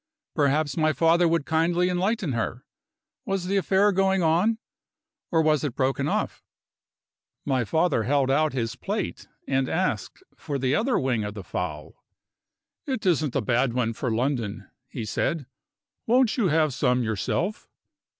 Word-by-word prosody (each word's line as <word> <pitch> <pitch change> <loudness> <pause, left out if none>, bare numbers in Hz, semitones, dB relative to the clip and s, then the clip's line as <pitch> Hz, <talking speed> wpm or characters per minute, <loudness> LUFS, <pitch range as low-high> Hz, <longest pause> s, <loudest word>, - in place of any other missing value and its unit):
Perhaps 145 -1 +1
my 155 -1 +3
father 170 +2 +4
would 165 -3 +1
kindly 170 +2 +2
enlighten 185 - 0
her? 120 +2 -3 0.6
Was 195 -2 -2
the 195 +2 -1
affair 195 +2 +3
going 190 -1 +2
on? 175 +8 +3 0.7
or 165 -2 +2
was 155 -1 +2
it 140 -5 -2
broken 135 +1 0
off? - - -2 1.0
My 130 -3 +1
father 160 - +1
held 135 +3 +1
out 155 +2 +2
his 115 -3 -2
plate - - -4 0.2
and 135 -1 +1
asked 190 - -2
for 145 -3 -4
the 130 0 0
other 235 - +2
wing 125 -5 0
of 105 0 -5
the 100 - -7
fowl. 75 -4 -5 0.8
"It 260 -6 -3
isn't 155 -7 +1
a 135 - +2
bad 120 +3 +1
one 115 -2 0
for 125 +3 -3
London," 115 -4 -2 0.2
he 120 -3 -6
said; 145 +7 -1 0.6
"won't 245 0 +3
you 230 -7 +2
have 155 -3 +2
some 125 -1 +1
yourself?" 115 - -2
150 Hz, 150 wpm, -25 LUFS, 125-180 Hz, 1.0 s, father